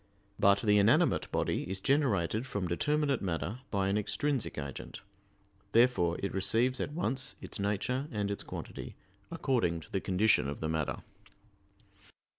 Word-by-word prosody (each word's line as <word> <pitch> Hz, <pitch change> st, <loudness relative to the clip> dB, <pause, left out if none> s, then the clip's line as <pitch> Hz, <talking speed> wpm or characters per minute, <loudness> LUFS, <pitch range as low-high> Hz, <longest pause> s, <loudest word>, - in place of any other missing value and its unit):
But 100 Hz, 0 st, +5 dB
the 105 Hz, -1 st, +4 dB
inanimate 100 Hz, +2 st, +3 dB
body -, -, -1 dB
is 95 Hz, 0 st, -2 dB
generated 120 Hz, -, +1 dB
from 100 Hz, -6 st, -2 dB
determinate 145 Hz, -, +1 dB
matter 95 Hz, +5 st, -3 dB
by 95 Hz, -2 st, 0 dB
an 100 Hz, +2 st, +1 dB
extrinsic 135 Hz, +4 st, -2 dB
agent; 70 Hz, -2 st, -6 dB, 0.7 s
therefore 115 Hz, -8 st, +4 dB
it 100 Hz, -, -2 dB
receives 115 Hz, +7 st, +2 dB
at 145 Hz, -, -3 dB
once 135 Hz, -5 st, 0 dB
its -, -, -6 dB
nature 105 Hz, +7 st, -1 dB
and 105 Hz, -2 st, -2 dB
its 100 Hz, -, -3 dB
quantity, -, -, -7 dB, 0.3 s
according 125 Hz, -, 0 dB
to -, -, -15 dB
the 95 Hz, -, -1 dB
condition 100 Hz, -3 st, +3 dB
of 70 Hz, -, -5 dB
the 80 Hz, -, -2 dB
matter. 80 Hz, -2 st, -2 dB
100 Hz, 145 wpm, -31 LUFS, 95-130 Hz, 0.7 s, But